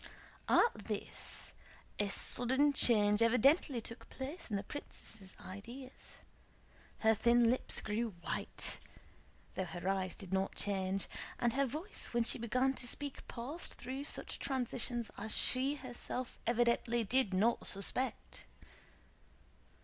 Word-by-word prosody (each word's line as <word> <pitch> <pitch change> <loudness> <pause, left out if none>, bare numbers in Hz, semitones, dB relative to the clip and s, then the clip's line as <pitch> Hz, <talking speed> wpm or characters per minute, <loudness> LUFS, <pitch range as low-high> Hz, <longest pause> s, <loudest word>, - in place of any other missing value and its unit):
At 470 - +3
this - - -2 0.5
a 205 -1 +1
sudden 260 +7 +4
change 210 -5 +6
evidently 250 +3 +4
took 230 +2 -7
place 280 +5 -6
in 210 - -1
the 200 - -2
princess' 215 -6 -6
ideas; 235 +8 -9 0.9
her 220 0 +5
thin 235 +2 +4
lips 255 - +2
grew 220 -1 -2
white, - - -4 0.7
though 190 - -2
her 175 +1 -6
eyes 190 -2 0
did 195 -2 -7
not 190 0 0
change, 195 -1 0 0.3
and 240 -2 +1
her 275 +1 +2
voice 315 - -4
when 235 - +4
she 235 - 0
began 255 +4 +1
to 245 - -5
speak 285 +2 -5
passed 270 +8 -6
through 260 +3 -5
such - - -2
transitions 245 -2 0
as 220 +1 -2
she 265 +3 +2
herself 255 -2 -4
evidently 235 0 +2
did 240 0 +2
not 215 +6 +2 0.2
expect. 255 +6 -2
235 Hz, 125 wpm, -35 LUFS, 205-260 Hz, 0.9 s, change